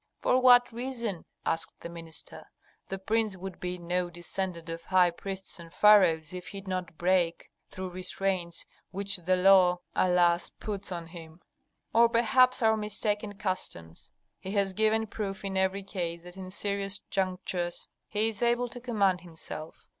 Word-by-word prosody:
"For 255 Hz, +1 st, +2 dB
what 245 Hz, -1 st, +7 dB
reason?" 235 Hz, -6 st, -4 dB, 0.2 s
asked 165 Hz, 0 st, -2 dB
the -, -, -6 dB
minister. 165 Hz, -1 st, -5 dB, 0.4 s
"The 195 Hz, -, -4 dB
prince 215 Hz, 0 st, 0 dB
would 190 Hz, 0 st, -7 dB
be 180 Hz, 0 st, -3 dB
no 175 Hz, +1 st, -1 dB
descendant 175 Hz, 0 st, -4 dB
of 165 Hz, 0 st, -6 dB
high 180 Hz, -2 st, +4 dB
priests 190 Hz, +1 st, -3 dB
and 165 Hz, -1 st, -11 dB
pharaohs 180 Hz, -6 st, +5 dB
if 180 Hz, 0 st, -7 dB
he 195 Hz, +3 st, -7 dB
did 195 Hz, -, -19 dB
not 180 Hz, -3 st, -4 dB
break 175 Hz, -1 st, +1 dB, 0.2 s
through 185 Hz, 0 st, -6 dB
restraints 185 Hz, -1 st, -1 dB, 0.2 s
which 200 Hz, +1 st, 0 dB
the 180 Hz, +1 st, +1 dB
law, 180 Hz, -1 st, +5 dB
alas, 175 Hz, -1 st, +3 dB
puts 200 Hz, -3 st, -4 dB
on 170 Hz, -2 st, -4 dB
him, 165 Hz, -1 st, -11 dB, 0.5 s
or 235 Hz, +1 st, +6 dB
perhaps 240 Hz, +2 st, +4 dB
our 220 Hz, 0 st, +4 dB
mistaken 210 Hz, -1 st, -2 dB
customs. 85 Hz, -, -4 dB, 0.3 s
He 190 Hz, -, -7 dB
has 200 Hz, -2 st, +1 dB
given 220 Hz, +2 st, +2 dB
proof 200 Hz, -2 st, -5 dB
in 195 Hz, -1 st, -3 dB
every 190 Hz, +1 st, +1 dB
case 170 Hz, -3 st, -4 dB
that 180 Hz, 0 st, -8 dB
in 190 Hz, -1 st, -8 dB
serious 200 Hz, 0 st, -1 dB
junctures 185 Hz, -2 st, -2 dB, 0.2 s
he 215 Hz, +1 st, +1 dB
is 220 Hz, -, -6 dB
able 240 Hz, +1 st, +2 dB
to 245 Hz, +1 st, -9 dB
command 200 Hz, -7 st, +1 dB
himself. 160 Hz, -2 st, -8 dB
190 Hz, 160 wpm, -29 LUFS, 175-210 Hz, 0.5 s, what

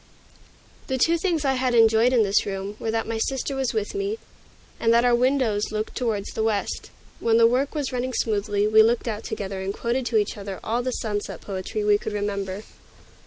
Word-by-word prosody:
The 265 Hz, -, -1 dB
two 330 Hz, +6 st, +3 dB
things 330 Hz, -4 st, 0 dB
I 270 Hz, -, +3 dB
had 255 Hz, -1 st, 0 dB
enjoyed 225 Hz, +1 st, +5 dB
in 240 Hz, -3 st, +4 dB
this 200 Hz, 0 st, +2 dB
room 195 Hz, +1 st, -4 dB
were 225 Hz, -, -3 dB
that 225 Hz, 0 st, 0 dB
my 225 Hz, 0 st, -3 dB
sister 270 Hz, +3 st, -1 dB
was 265 Hz, -2 st, 0 dB
with 215 Hz, -2 st, -2 dB
me, 400 Hz, +2 st, -2 dB, 0.6 s
and 230 Hz, -, +3 dB
that 235 Hz, +1 st, +4 dB
our 245 Hz, -, +4 dB
windows 240 Hz, -5 st, +1 dB
looked 215 Hz, 0 st, -3 dB
toward 225 Hz, -5 st, -1 dB
the -, -, -2 dB
west. 220 Hz, -2 st, -1 dB, 0.3 s
When 225 Hz, -1 st, +3 dB
the 230 Hz, -, +6 dB
work 260 Hz, +6 st, +1 dB
was 285 Hz, -3 st, -2 dB
running 255 Hz, +1 st, -2 dB
smoothly, 205 Hz, -2 st, 0 dB
we 215 Hz, +1 st, +6 dB
looked 230 Hz, +2 st, +2 dB
out 215 Hz, -2 st, -3 dB
together 195 Hz, -1 st, -4 dB
and 190 Hz, +1 st, -2 dB
quoted 240 Hz, +2 st, -1 dB
to 225 Hz, -, +1 dB
each 210 Hz, 0 st, 0 dB
other 195 Hz, -1 st, -6 dB
all 235 Hz, +3 st, 0 dB
the 255 Hz, -, -2 dB
sunset 210 Hz, -4 st, -3 dB
poetry 195 Hz, +2 st, -4 dB
we 205 Hz, 0 st, +4 dB
could -, -, -5 dB
remember. 200 Hz, -1 st, -3 dB
225 Hz, 210 wpm, -24 LUFS, 205-250 Hz, 0.6 s, the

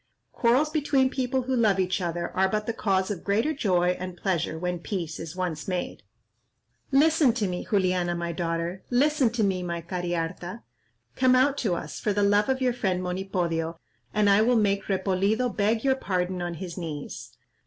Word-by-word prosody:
Quarrels 255 Hz, +6 st, +2 dB
between 275 Hz, -4 st, +2 dB
people 260 Hz, -1 st, -1 dB
who 260 Hz, +1 st, -1 dB
love 215 Hz, -5 st, +3 dB
each 185 Hz, +1 st, 0 dB
other 170 Hz, 0 st, -2 dB
are 190 Hz, 0 st, +3 dB
but 210 Hz, +1 st, -1 dB
the 230 Hz, -, -2 dB
cause 195 Hz, -3 st, 0 dB
of 190 Hz, -, -5 dB
greater 220 Hz, +10 st, +1 dB
joy 180 Hz, -, +2 dB
and 185 Hz, -1 st, -6 dB
pleasure 175 Hz, -5 st, -1 dB
when 180 Hz, +1 st, -2 dB
peace 170 Hz, -3 st, -4 dB
is 165 Hz, +1 st, -7 dB
once 175 Hz, -5 st, -3 dB
made. 185 Hz, -2 st, -3 dB, 0.9 s
Listen 295 Hz, -2 st, +4 dB
to 220 Hz, -4 st, -1 dB
me, 180 Hz, -1 st, -4 dB
Juliana, 180 Hz, -3 st, +1 dB
my 170 Hz, 0 st, -3 dB
daughter; 170 Hz, +1 st, -2 dB
listen 275 Hz, 0 st, +3 dB
to 230 Hz, -1 st, -1 dB
me, 190 Hz, -2 st, +1 dB
my 170 Hz, -1 st, -3 dB
Cariharta. 175 Hz, +3 st, -4 dB, 0.5 s
Come 255 Hz, -1 st, +4 dB
out 265 Hz, +2 st, +4 dB
to 195 Hz, -7 st, 0 dB
us, 155 Hz, -2 st, -6 dB
for 210 Hz, -, 0 dB
the 205 Hz, +1 st, +1 dB
love 205 Hz, +3 st, +3 dB
of 265 Hz, 0 st, 0 dB
your 250 Hz, -1 st, +2 dB
friend 190 Hz, -6 st, -1 dB
Monipodio, 180 Hz, -3 st, -2 dB, 0.3 s
and 210 Hz, -1 st, +2 dB
I 200 Hz, +1 st, +5 dB
will 245 Hz, +3 st, +3 dB
make 200 Hz, -2 st, +1 dB
Repolido 200 Hz, +5 st, 0 dB
beg 220 Hz, +2 st, +1 dB
your 270 Hz, -1 st, +4 dB
pardon 185 Hz, -6 st, -2 dB
on 175 Hz, -1 st, -3 dB
his 180 Hz, +1 st, -6 dB
knees." 145 Hz, -, -7 dB
190 Hz, 185 wpm, -26 LUFS, 175-230 Hz, 0.9 s, I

